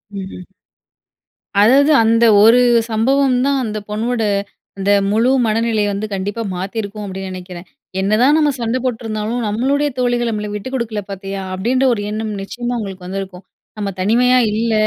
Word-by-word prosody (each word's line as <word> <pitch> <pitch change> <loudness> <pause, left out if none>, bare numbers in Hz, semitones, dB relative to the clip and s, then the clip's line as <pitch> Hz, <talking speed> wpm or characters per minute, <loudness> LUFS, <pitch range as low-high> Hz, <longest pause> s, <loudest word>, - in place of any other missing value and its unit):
ம்ஹ்ம். 190 -2 -7 1.2
அதாவது 275 +7 +5
அந்த 230 +1 +3 0.2
ஒரு 230 +3 +7 0.3
சம்பவம் 255 +4 +2
தான் 280 -1 +1
அந்த 215 -2 -3
பொண்ணோட, 225 +3 -2 0.6
அந்த 195 +1 0 0.2
முழு 230 +4 +2 0.2
மனநிலைய 220 -1 +1
வந்து 210 +2 -3
கண்டிப்பா 200 +4 -3
மாத்தியிருக்கும் 205 +2 -5
அப்பிடின்னு 190 -1 -6
நினைக்கிறேன். 180 -1 -9 0.3
"என்னதான் 220 +9 +3
நம்ம 300 -2 +3
சண்ட 230 +2 -1
போட்ருந்தாலும் 225 -1 -3
நம்மளுடைய 275 +7 0
தோழிகள் 245 -1 +1
நம்மள 210 -1 -3
விட்டு 210 +5 -5
குடுக்கல 225 -4 -3
பார்த்தியா!"அப்டின்ற 195 +6 -2
ஒரு 205 - -3
எண்ணம் 215 0 -3
நிச்சயமா 240 +5 -4
உங்களுக்கு 195 -4 -7
வந்திருக்கும். 190 -1 -6 0.4
"நம்ம 200 -1 -2
தனிமையா 245 +6 +3
இல்ல. 225 +1 0
220 Hz, 135 wpm, -18 LUFS, 195-245 Hz, 1.2 s, ஒரு